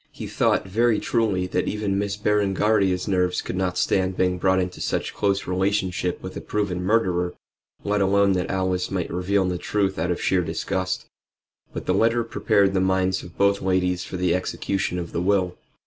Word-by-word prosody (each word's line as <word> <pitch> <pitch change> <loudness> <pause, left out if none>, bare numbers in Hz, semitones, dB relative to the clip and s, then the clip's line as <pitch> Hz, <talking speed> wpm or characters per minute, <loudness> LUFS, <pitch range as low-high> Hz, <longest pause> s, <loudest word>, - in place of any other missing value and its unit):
He - - -8
thought, - - +1
very 115 +3 +2
truly, 105 -6 0
that 90 - -1
even 100 -2 -1
Miss 100 0 -2
Berengaria's 100 -2 +1
nerves 90 -2 +1
could - - -4
not 90 -1 -1
stand 95 0 +1
being 90 -1 +1
brought 95 0 +3
into 90 -1 -3
such - - -2
close 100 -1 0
relationship 95 -1 -1
with - - -7
a - - -5
proven 100 -4 -2
murderer, 90 -4 +1 0.5
let 105 0 0
alone 100 +1 +3
that 90 -2 -1
Alice 95 -1 -1
might 90 -3 -3
reveal 95 +2 +1
the 90 -1 -2
truth 95 -3 -1
out 85 +2 -1
of 90 - -1
sheer 95 -1 +2
disgust. 95 +3 -2 0.7
But - - -6
the - - +1
letter 115 +1 +2
prepared 100 -3 +2
the 95 - +2
minds 95 0 +1
of 85 - -13
both 100 0 +3
ladies 90 -1 +1
for 95 - -6
the 90 -1 +1
execution 90 0 -2
of 85 -2 -5
the 85 - -2
will. 90 -1 +1
95 Hz, 185 wpm, -24 LUFS, 90-100 Hz, 0.7 s, brought